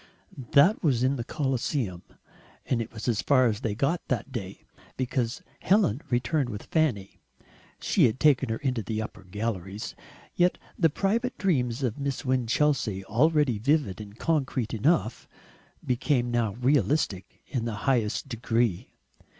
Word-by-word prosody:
That 165 +10 +5
was 130 -6 +2
in 130 +2 +2
the 120 - -3
Colosseum, 130 - -2 0.6
and 120 -3 0
it 115 - -6
was 110 +1 -7
as 110 -5 +1
far 130 +1 +4
as 110 -3 +1
they 115 -5 -2
got 140 +9 0
that - - -2
day, 100 -6 -6 0.3
because 125 -2 -2 0.2
Helen 185 - +2
returned 130 +2 0
with 105 -3 -6
Fanny 125 - -1 0.6
she - - +3
had 115 +2 0
taken 140 -5 +4
her 110 - -1
into 130 -5 -1
the 110 +2 -3
upper 110 -2 -6
galleries. 100 0 -4 0.4
Yet 180 +1 +2 0.2
the 165 - +3
private 225 - -1
dreams 130 - 0
of 125 +1 -1
Miss 140 -1 -3
Winchelsea, 125 -5 +1
already 145 0 +2
vivid 140 -5 +1
and 105 0 -11
concrete 135 -8 -1
enough, 115 +1 +1 0.6
became 125 -1 +1
now 115 -4 0
realistic 125 -4 0
in 125 -5 -3
the 115 -2 -3
highest 120 -5 +1
degree. 115 -4 -1
125 Hz, 145 wpm, -27 LUFS, 110-145 Hz, 0.6 s, That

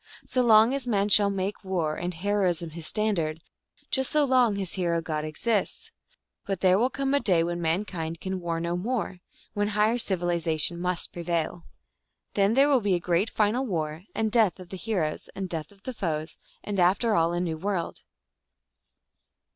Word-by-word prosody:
So 255 - +1
long 225 +1 +6
as 275 -2 -2
man 205 -3 +1
shall 205 0 +6
make 195 +1 -3
war 170 -5 -1
and 175 +1 -3
heroism 180 -2 -1
his 160 0 -6
standard, 170 -8 -1 0.5
just 265 -1 +1
so 300 -1 +3
long 250 -5 +3
his 195 -3 -2
hero 170 -3 0
god 155 -2 -3
exists. 195 +7 -2 0.5
But 195 -2 -3
there 185 0 +4
will 245 +3 +3
come 275 0 -2
a 285 - +4
day 185 -10 +3
when 175 0 -3
mankind 165 -1 -2
can 190 -1 -4
war 170 -2 -2
no 170 +1 -2
more, 200 -1 -2 0.3
when 205 0 0
higher 215 +3 +2
civilization 170 -4 +1
must 180 0 -2
prevail. 170 0 -2 0.7
Then 200 +2 +2
there 275 +2 +5
will 275 -4 +3
be 200 -3 +2
a - - 0
great 175 +5 +1
final 220 +5 +1
war, 160 -6 -3
and 220 -1 0
death 215 -5 +3
of 180 -1 -11
the 190 - -6
he 220 +2 -2
roes, 155 -3 -2
and 195 -1 -3
death 165 -1 -5
of 200 -1 -22
their 255 - -5
foes, 160 -7 -3 0.3
and 205 -2 -3
after 195 +6 +3
all 165 -2 +3
a 175 - -1
new 165 -3 -2
world. 190 -2 -3
190 Hz, 185 wpm, -27 LUFS, 170-215 Hz, 0.7 s, long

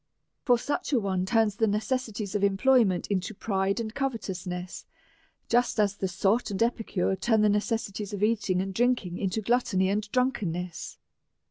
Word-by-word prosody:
For 245 -3 +5
such 290 +6 -3
a 255 - +4
one 190 -3 -1
turns 215 0 +2
the 225 - +2
necessities 215 -1 -2
of 205 -1 -1
employments 200 -1 +3
into 195 +1 -2
pride 195 0 -1
and 220 -2 -4
covetousness, 190 -9 -4 0.6
just 240 -1 +2
as 205 -1 +2
the 195 - -2
sot 195 +6 +1
and 200 +2 +1
epicure 220 -5 0
turn 220 +3 +2
the 210 - +5
necessities 210 -1 -1
of 205 0 -3
eating 205 -4 +1
and 195 0 -5
drinking 230 -5 0
into 195 +2 -1
glut 240 +4 +2
tony 190 -4 +1
and 205 +1 -2
drunkenness. 185 -10 -2
205 Hz, 160 wpm, -27 LUFS, 190-230 Hz, 0.6 s, For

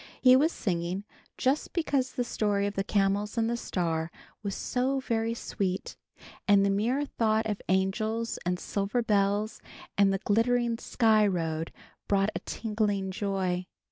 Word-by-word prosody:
He 255 -1 +7
was 300 +5 +4
singing 180 - -2 0.3
just 270 +4 0
because 280 -6 0
the 250 - 0
story 205 -4 0
of 205 - -2
the 195 - -1
Camels 200 +2 0
and 225 -1 +2
the 235 - 0
Star 165 -7 -2 0.3
was 200 -2 -3
so 260 +2 0
very 230 -3 -1
sweet, 190 -4 -3 0.5
and 200 -1 +6
the 200 - +2
mere 240 +8 +1
thought 220 -4 +1
of 210 -2 -2
angels 215 +5 0
and 180 +1 0
silver 205 +4 -1
bells 205 0 +1 0.4
and 200 -1 +6
the 195 - +1
glittering 230 +3 +1
Sky 215 -4 +3
Road 165 -3 -2 0.4
brought 200 +1 +2
a - - -3
tingling 210 -3 -1
joy. 185 -2 -1
205 Hz, 150 wpm, -29 LUFS, 195-230 Hz, 0.5 s, He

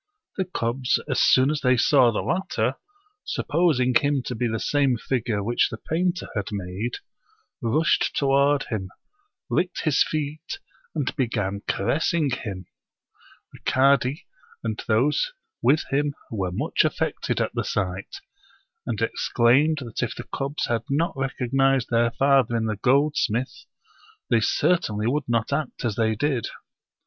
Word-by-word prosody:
The 190 - -1
cubs, 125 -6 0
as - - +1
soon 130 +3 +5
as 155 - -2
they 125 -1 +3
saw 125 0 +5
the 110 - -2
latter, 150 - 0 0.5
supposing 145 -6 +1
him 140 +1 +2
to 125 - -4
be 120 +1 -1
the 110 -1 -2
same 140 -4 +2
figure 115 -3 -2
which 120 +4 +2
the 110 - -6
painter 175 +7 -1
had 105 -2 -2
made, 100 +4 -4 0.7
rushed 150 +7 +1
toward 140 0 +3
him, 95 -5 -4 0.6
licked 180 0 -1
his 155 -4 +2
feet, 155 +1 -4 0.4
and 145 -3 -1
began 105 -7 -1
caressing 150 +7 +1
hinu 100 -7 -5 0.9
The - - -13
cadi 135 +2 +2 0.4
and 110 -2 -3
those 140 - +2 0.3
with 150 - +3
him 145 +1 0 0.2
were 95 -5 -2
much 90 - +1
affected - - -1
at - - -1
the - - -1
sight, 95 0 -3 0.7
and - - -2
exclaimed 140 +6 +2
that 115 - -5
if - - -2
the - - -7
cubs 140 +2 -2
had 115 -2 0
not 155 +4 0
recognized 135 -1 +1
their 115 0 +3
father 135 -1 +3
in 110 - -1
the 110 -2 -2
goldsmith, 130 -1 +1 0.7
they 115 - +5
certainly 110 -3 +1
would 135 +2 -1
not 115 +2 0
act 140 -3 -3
as 110 -4 -1
they 110 -1 +1
did. 135 -1 0
130 Hz, 145 wpm, -24 LUFS, 115-145 Hz, 0.9 s, soon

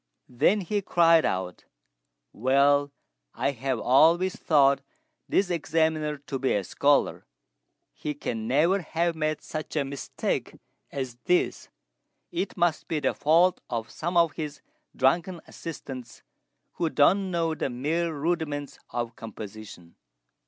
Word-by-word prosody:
Then 190 - +2
he 205 +3 -1
cried 165 -3 +4
out, 90 -1 -3 0.7
"Well, 140 +3 +3 0.4
I - - 0
have 130 -1 -2
always 165 +10 +4
thought 140 -3 +3 0.5
this 190 -2 +2
Examiner 160 -2 0
to 140 -1 -6
be 130 - +1
a 100 - 0
scholar; - - +1 0.7
he 150 -1 -5
can 115 -5 -4
never 165 +10 +3
have 170 +1 -1
made 155 -1 -2
such 155 0 -6
a 145 -2 +1
mistake 140 0 -3 0.4
as 130 -3 -4
this; 180 - +1 0.6
it 180 +2 -3
must 175 -2 +1
be 160 - -1
the - - 0
fault 170 +4 +3
of 115 -2 -3
some 175 +2 -2
of 170 -2 +5
his 145 -1 -6 0.3
drunken 170 +7 +1
assistants, 130 -7 -8 0.5
who 170 -2 -1
don't 190 +7 +3
know 165 -2 0
the 155 - -2
mere 155 +7 -1
rudiments 150 -2 -2
of 120 -1 -4
composition." 105 -5 -10
150 Hz, 130 wpm, -27 LUFS, 130-170 Hz, 0.7 s, of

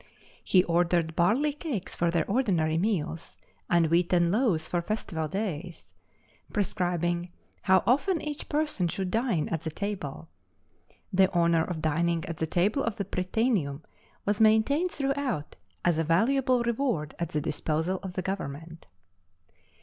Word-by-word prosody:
He 185 -2 +4
ordered 170 -1 +1
barley 245 - +2
cakes 285 - -4
for 170 - +1
their 170 -2 +1
ordinary 190 -9 +1
meals, 170 -5 -2 0.3
and 170 -1 +4
wheaten 175 +1 +2
loaves 200 -8 +1
for 175 - -1
festival 170 -5 -3
days, 180 -2 -5 0.6
prescribing 175 -3 -1 0.3
how 190 -1 +4
often 320 +8 +2
each 300 -1 -6
person 295 - 0
should 185 +2 -3
dine 220 - +1
at 165 -2 -2
the 160 - -3
table. 165 -4 -5 0.9
The 190 0 +4
honor 170 -1 +3
of 165 -2 -5
dining 165 +2 +1
at 165 - -5
the 160 - -1
table 200 - +1
of 230 -3 -1
the 200 - -3
Prytaneum 185 - -1 0.4
was 205 0 0
maintained 220 +11 +4
throughout 275 - -2 0.3
as 170 -2 +3
a - - +2
valuable 245 - +2
reward 235 - -1
at 170 -2 -2
the 150 - -1
disposal 160 +5 -1
of 190 -2 -6
the 185 - -3
government. 165 -3 -5
180 Hz, 140 wpm, -28 LUFS, 165-220 Hz, 0.9 s, He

